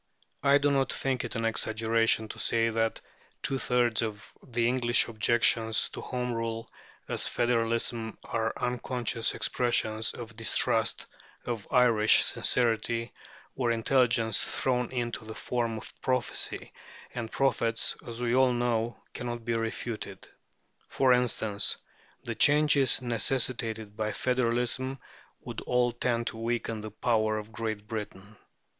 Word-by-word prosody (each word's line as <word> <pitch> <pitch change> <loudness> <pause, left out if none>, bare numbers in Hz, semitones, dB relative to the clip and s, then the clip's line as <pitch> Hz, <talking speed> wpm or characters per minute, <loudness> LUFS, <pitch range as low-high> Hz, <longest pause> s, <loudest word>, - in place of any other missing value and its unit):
I 140 0 +5
do 145 0 +2
not 135 -1 +1
think 130 -2 0
it 120 - -5
an 115 0 -1
exaggeration 110 0 +2
to - - -8
say 115 0 +1
that 115 0 -1 0.4
two 135 - 0
thirds 120 -3 +1
of 110 -2 -6
the 120 -1 -1
English 120 -1 +3
objections 115 0 +2
to - - -8
Home 125 -1 -3
Rule 115 0 -3 0.4
as - - 0
federalism 115 -1 0
are 115 -1 -1
unconscious 125 -1 -1
expressions 110 -3 0
of 110 -2 -9
distrust 115 +1 +1 0.4
of 115 -4 -4
Irish 115 -4 +6
sincerity 115 0 +1 0.4
or 125 -3 0
intelligence 115 -1 +3
thrown 125 -2 0
into 120 -3 -3
the 110 0 -8
form 115 -2 -2
of - - -9
prophecy, 130 -2 -2 0.4
and 115 -2 -5
prophets, 115 -4 +1
as 115 0 -6
we 120 0 +1
all 130 -1 +4
know, 120 -1 0 0.2
cannot 120 -1 -5
be 120 - 0
refuted. 115 -3 -4 0.6
For 130 -2 +3
instance, 110 -4 0 0.5
"the - - -3
changes 145 -3 +4
necessitated 115 -3 -1
by 110 0 -2
federalism 125 +1 0 0.4
would - - -7
all 125 0 +1
tend 120 0 -1
to 110 - -4
weaken 115 -1 -2
the 110 - -6
power 110 0 0
of 105 +1 -7
Great 110 -2 -4
Britain" 105 -3 -6
(Dicey, - - -18
p. - - -31
115 Hz, 135 wpm, -29 LUFS, 110-125 Hz, 0.6 s, Irish